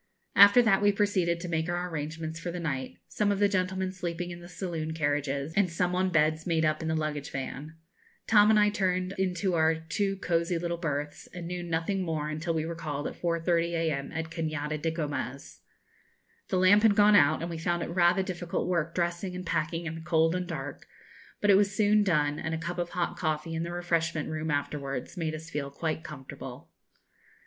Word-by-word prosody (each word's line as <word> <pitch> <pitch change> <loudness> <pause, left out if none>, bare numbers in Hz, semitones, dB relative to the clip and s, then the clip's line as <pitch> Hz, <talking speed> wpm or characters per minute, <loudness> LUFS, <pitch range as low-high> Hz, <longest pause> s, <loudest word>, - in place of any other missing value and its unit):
After 200 +5 +8
that 200 -4 +4
we 205 0 +5
proceeded 195 -4 +1
to 180 - -5
make 160 0 -1
our 175 +1 -1
arrangements 160 0 -5
for 175 - -4
the 175 +1 -4
night; 130 - -3
some 205 -1 0
of 200 - 0
the 205 +1 +4
gentlemen 185 -1 -1
sleeping 175 -1 -4
in 175 - -8
the 175 - -11
saloon 165 -4 -4
carriages, 145 -1 -1
and 195 -3 +3
some 180 +1 0
on 185 +1 +1
beds 155 0 +2
made 160 -2 +2
up 155 +1 +1
in 160 - -3
the 160 - 0
luggage 150 -2 -2
van. 140 +3 -6 0.5
Tom 210 -1 +6
and 215 -1 +6
I 210 0 +4
turned 185 -2 0
into 185 0 0
our 160 -1 +3
two 170 +5 -2
cozy 170 -1 0
little 170 0 -3
berths, 145 -3 -3
and 175 -1 -6
knew 180 +1 -4
nothing 170 +3 -1
more 160 -4 -2
until 155 +2 -2
we 155 0 0
were 170 - -3
called 150 -3 -4
at - - -3
4.30 170 0 +1
a.m. 155 -4 -1
at 160 0 -4
Cañada 155 -2 -3
de 165 - +1
Gomez. 145 -5 -4 0.9
The 185 - 0
lamp 185 +3 +6
had 215 -2 +5
gone 210 0 +6
out, 155 -2 +5
and 170 - -3
we 165 - -5
found 175 +1 0
it - - -5
rather 175 +2 +3
difficult 175 -3 -3
work 170 -2 -1
dressing 175 +1 -1
and 180 0 -6
packing 165 +1 -1
in 165 - -3
the 165 - -7
cold 160 0 +2
and 180 0 -2
dark; 145 -5 -6 0.5
but 205 - +5
it - - +7
was 200 -1 +2
soon 210 0 +4
done, 150 -6 +1
and 160 +1 -2
a - - -2
cup 170 +2 -4
of 175 0 -1
hot 175 -1 -2
coffee 155 0 -2
in 165 - -2
the 170 +1 -3
refreshment 170 -2 -1
room 155 0 -3
afterwards 140 -2 -3
made 160 -3 -2
us 160 +1 -9
feel 145 -3 -3
quite 155 +2 -3
comfortable. 150 -5 -9
170 Hz, 210 wpm, -29 LUFS, 155-180 Hz, 0.9 s, After